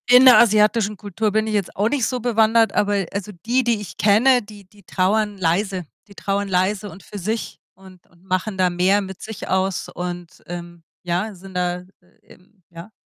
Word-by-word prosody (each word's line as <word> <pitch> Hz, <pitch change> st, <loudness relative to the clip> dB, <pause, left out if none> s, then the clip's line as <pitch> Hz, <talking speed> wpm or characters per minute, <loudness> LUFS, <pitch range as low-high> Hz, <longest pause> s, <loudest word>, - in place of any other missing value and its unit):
In 250 Hz, +1 st, +8 dB
der 255 Hz, -1 st, +9 dB
asiatischen 210 Hz, -1 st, +3 dB
Kultur 210 Hz, +2 st, -2 dB
bin 220 Hz, +1 st, 0 dB
ich 215 Hz, -, -2 dB
jetzt 205 Hz, -3 st, -2 dB
auch 205 Hz, +2 st, +1 dB
nicht 275 Hz, -4 st, 0 dB
so 250 Hz, +2 st, -2 dB
bewandert, 225 Hz, -1 st, +3 dB
aber 205 Hz, -2 st, +1 dB
also 200 Hz, +1 st, -4 dB
die, 250 Hz, +3 st, +2 dB
die 235 Hz, -3 st, +1 dB
ich 190 Hz, -7 st, -9 dB
kenne, 240 Hz, +5 st, +4 dB
die 205 Hz, -1 st, -14 dB
die 200 Hz, +2 st, -22 dB
trauern 205 Hz, +3 st, 0 dB
leise, 185 Hz, +1 st, -1 dB, 0.2 s
die 200 Hz, -, -17 dB
trauern 200 Hz, +1 st, -2 dB
leise 190 Hz, +2 st, 0 dB
und 190 Hz, -, -13 dB
für 205 Hz, -, -9 dB
sich 215 Hz, +5 st, -4 dB, 0.2 s
und 190 Hz, -2 st, -17 dB
und 175 Hz, 0 st, -26 dB
machen 190 Hz, +2 st, -2 dB
da 185 Hz, -1 st, +3 dB
mehr 185 Hz, +3 st, +2 dB
mit 190 Hz, -1 st, -8 dB
sich 220 Hz, -2 st, -7 dB
aus 190 Hz, -1 st, -1 dB
und, 175 Hz, -1 st, -7 dB
ähm, 175 Hz, -1 st, -8 dB, 0.2 s
ja, 180 Hz, +5 st, -2 dB
sind 190 Hz, 0 st, -13 dB
da 180 Hz, 0 st, -1 dB, 0.4 s
eben 190 Hz, +1 st, -22 dB
ja. 170 Hz, +4 st, -11 dB
200 Hz, 195 wpm, -21 LUFS, 185-215 Hz, 0.4 s, der